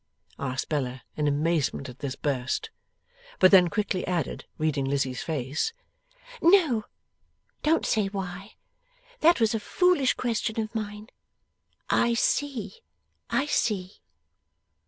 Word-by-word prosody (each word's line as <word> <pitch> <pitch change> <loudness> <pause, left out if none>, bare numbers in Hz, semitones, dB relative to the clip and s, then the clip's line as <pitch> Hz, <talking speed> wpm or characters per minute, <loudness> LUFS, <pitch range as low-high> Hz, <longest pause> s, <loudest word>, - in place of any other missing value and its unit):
asked 130 -1 -2
Bella, 130 -4 -2
in 150 -1 0
amazement 145 -1 0
at 125 0 -11
this 140 -3 -4
burst. 140 - -2 0.7
But 185 - +6
then 185 -3 +8
quickly 195 0 -1
added, 175 -5 -2
reading 150 -3 0
Lizzie's 135 -2 -1
face: 150 - -2 0.7
'No. 330 - +4 0.8
Don't 320 +2 +2
say 210 -3 +1
why. 195 0 -6 0.6
That 335 0 +5
was 225 -1 +3
a 225 - 0
foolish 345 - +2
question 230 -2 -1
of 220 0 -3
mine. 210 0 -5 0.8
I 235 0 +2
see, 275 - -1 0.5
I 275 - +1
see. 200 -9 -1
195 Hz, 115 wpm, -27 LUFS, 145-235 Hz, 0.8 s, then